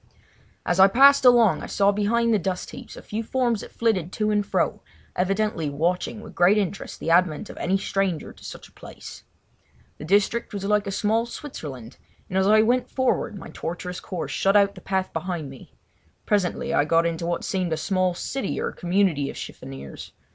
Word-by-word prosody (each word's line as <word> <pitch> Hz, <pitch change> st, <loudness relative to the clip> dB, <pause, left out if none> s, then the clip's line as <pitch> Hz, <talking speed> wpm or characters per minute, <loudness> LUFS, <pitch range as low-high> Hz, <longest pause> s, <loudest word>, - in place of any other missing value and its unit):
As 175 Hz, -, 0 dB
I 190 Hz, -, +9 dB
passed 275 Hz, +6 st, +6 dB
along 240 Hz, -4 st, +5 dB
I -, -, -6 dB
saw 200 Hz, 0 st, +3 dB
behind 230 Hz, +3 st, +1 dB
the 215 Hz, -, +3 dB
dust 185 Hz, 0 st, -3 dB
heaps -, -, -10 dB
a -, -, -10 dB
few 215 Hz, +2 st, -4 dB
forms 235 Hz, -2 st, 0 dB
that -, -, -10 dB
flitted 195 Hz, -7 st, 0 dB
to 215 Hz, -1 st, 0 dB
and 210 Hz, -1 st, +2 dB
fro, 200 Hz, -, -1 dB, 0.3 s
evidently 195 Hz, -4 st, 0 dB
watching 175 Hz, +8 st, -1 dB
with -, -, -11 dB
interest 200 Hz, +1 st, +1 dB
the 165 Hz, -, -2 dB
advent 175 Hz, +2 st, +2 dB
of -, -, -14 dB
any 190 Hz, +2 st, +1 dB
stranger 195 Hz, -4 st, -2 dB
to -, -, -18 dB
such -, -, -9 dB
a -, -, -25 dB
place. -, -, -11 dB, 0.8 s
The -, -, -7 dB
district 205 Hz, +6 st, +1 dB
was 200 Hz, -, -4 dB
like 210 Hz, 0 st, +1 dB
a -, -, -2 dB
small 220 Hz, +4 st, 0 dB
Switzerland, 135 Hz, -, -8 dB, 0.3 s
and 185 Hz, -, -2 dB
as 190 Hz, -, +2 dB
I 215 Hz, +1 st, +6 dB
went 245 Hz, +2 st, +1 dB
forward 260 Hz, -5 st, 0 dB
my 185 Hz, -, -9 dB
tortuous 180 Hz, +2 st, -5 dB
course 180 Hz, -4 st, -5 dB
shut 195 Hz, +1 st, +3 dB
out 200 Hz, 0 st, +3 dB
the -, -, -13 dB
path 190 Hz, -1 st, -2 dB
behind 165 Hz, -4 st, -4 dB
me. 135 Hz, -, -14 dB, 0.5 s
Presently 200 Hz, -4 st, 0 dB
I -, -, +4 dB
got 165 Hz, +2 st, +2 dB
into 170 Hz, 0 st, -2 dB
what 175 Hz, -, -2 dB
seemed 185 Hz, -3 st, -2 dB
a 160 Hz, -, 0 dB
small 185 Hz, +1 st, 0 dB
city 265 Hz, +4 st, -3 dB
or -, -, -2 dB
community 175 Hz, -6 st, 0 dB
of -, -, -8 dB
chiffoniers. 70 Hz, 0 st, -9 dB
195 Hz, 190 wpm, -24 LUFS, 175-215 Hz, 0.8 s, I